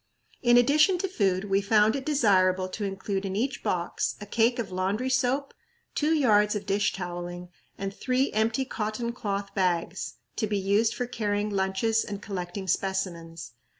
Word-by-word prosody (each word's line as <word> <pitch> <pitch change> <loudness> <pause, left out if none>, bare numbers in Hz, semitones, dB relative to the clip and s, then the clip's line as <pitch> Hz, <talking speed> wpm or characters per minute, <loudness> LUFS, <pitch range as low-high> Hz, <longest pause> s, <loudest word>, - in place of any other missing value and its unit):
In 240 -1 +5
addition 300 +9 +5
to 385 +2 -1
food, 195 - 0
we 195 0 +2
found 215 +3 +4
it 270 0 -4
desirable 190 -9 +3
to 205 +3 -5
include 195 0 -3
in 190 -1 -3
each 245 +4 -1
box 175 -1 -1
a 205 - -7
cake 230 +3 +2
of 220 -6 -3
laundry 195 +8 -1
soap, 265 +2 +1 0.4
two 315 +2 +2
yards 210 -7 +4
of 210 - -4
dish 205 +1 +1
toweling, 175 -1 -6 0.3
and 195 0 -4
three 255 +5 0
empty 225 +5 +1
cotton 230 0 -3
cloth 200 -4 -3
bags, 180 -1 -1 0.2
to 215 - 0
be 205 0 0
used 200 +3 +2
for 245 - -2
carrying 210 -3 -1
lunches 195 +3 +1
and 205 -1 -5
collecting 190 -1 -5
specimens. 170 -5 -2
205 Hz, 165 wpm, -27 LUFS, 190-235 Hz, 0.4 s, In